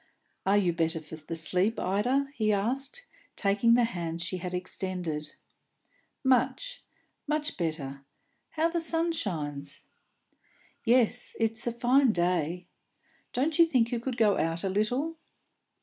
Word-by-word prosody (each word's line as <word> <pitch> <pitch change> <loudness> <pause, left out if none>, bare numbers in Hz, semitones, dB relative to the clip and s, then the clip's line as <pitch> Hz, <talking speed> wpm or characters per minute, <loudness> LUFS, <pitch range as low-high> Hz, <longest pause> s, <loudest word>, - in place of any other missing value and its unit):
"Are 200 +1 +5
you 180 -4 +2
better 165 0 0
for 155 0 -9
the 155 +2 -6
sleep, 180 +7 +1
Ida?" 250 +9 0
he 215 -6 +1
asked, 265 - 0 0.3
taking 205 +3 +3
the 245 - +4
hand 170 -7 -3
she 175 +2 -2
had 180 0 -5
extended. 180 -4 -3 0.9
"Much; 385 - +1 0.4
much 300 +1 -1
better. 140 -5 -4 0.5
How 320 +1 +3
the 335 0 -1
sun 330 +1 +2
shines!" 145 - -4 1.0
"Yes, 245 0 +3
it's 225 +1 +2
a - - +2
fine 250 +2 +3
day. 175 -2 0 0.7
Don't 300 +6 0
you 335 - +9
think 245 -7 +2
you 240 - 0
could 245 +1 -4
go 210 -4 +3
out 165 +1 -1
a 195 - 0
little?" 245 +11 -1
210 Hz, 135 wpm, -29 LUFS, 170-255 Hz, 1.0 s, you